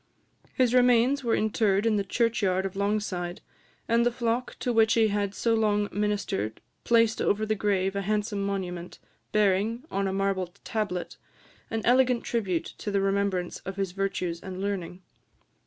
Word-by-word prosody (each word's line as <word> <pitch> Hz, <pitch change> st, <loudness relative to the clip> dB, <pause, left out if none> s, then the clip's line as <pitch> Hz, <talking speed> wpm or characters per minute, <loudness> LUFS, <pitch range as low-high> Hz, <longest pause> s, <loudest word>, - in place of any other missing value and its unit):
His 250 Hz, -3 st, +3 dB
remains 250 Hz, +2 st, +4 dB
were 230 Hz, -2 st, +2 dB
interred 210 Hz, -1 st, +1 dB
in 225 Hz, -2 st, +3 dB
the 200 Hz, -, +1 dB
churchyard 200 Hz, -3 st, +1 dB
of 195 Hz, 0 st, -4 dB
Longside; 200 Hz, -3 st, -2 dB, 0.5 s
and 230 Hz, +1 st, +3 dB
the 240 Hz, -, +2 dB
flock 235 Hz, +1 st, -2 dB
to 245 Hz, -, 0 dB
which 225 Hz, -1 st, +4 dB
he 225 Hz, -2 st, +4 dB
had 200 Hz, -1 st, -1 dB
so 230 Hz, -, +1 dB
long 210 Hz, -2 st, +1 dB
ministered 200 Hz, -, -2 dB, 0.2 s
placed 230 Hz, -1 st, +3 dB
over 215 Hz, +2 st, +1 dB
the 215 Hz, -, +1 dB
grave 195 Hz, -2 st, 0 dB
a 200 Hz, -, 0 dB
handsome 210 Hz, 0 st, -1 dB
monument, 180 Hz, -3 st, -4 dB, 0.3 s
bearing, 210 Hz, +4 st, +2 dB
on 195 Hz, 0 st, 0 dB
a -, -, -1 dB
marble 195 Hz, -1 st, 0 dB, 0.2 s
tablet, 205 Hz, -5 st, -3 dB, 0.5 s
an 225 Hz, -1 st, -2 dB
elegant 250 Hz, 0 st, +4 dB
tribute 195 Hz, -8 st, -1 dB
to -, -, -4 dB
the 200 Hz, -1 st, +1 dB
remembrance 195 Hz, -2 st, 0 dB
of 195 Hz, -, -7 dB
his 195 Hz, -2 st, -2 dB
virtues 180 Hz, -3 st, -2 dB
and 185 Hz, -1 st, -7 dB
learning. 185 Hz, -2 st, -4 dB
205 Hz, 160 wpm, -27 LUFS, 195-225 Hz, 0.5 s, remains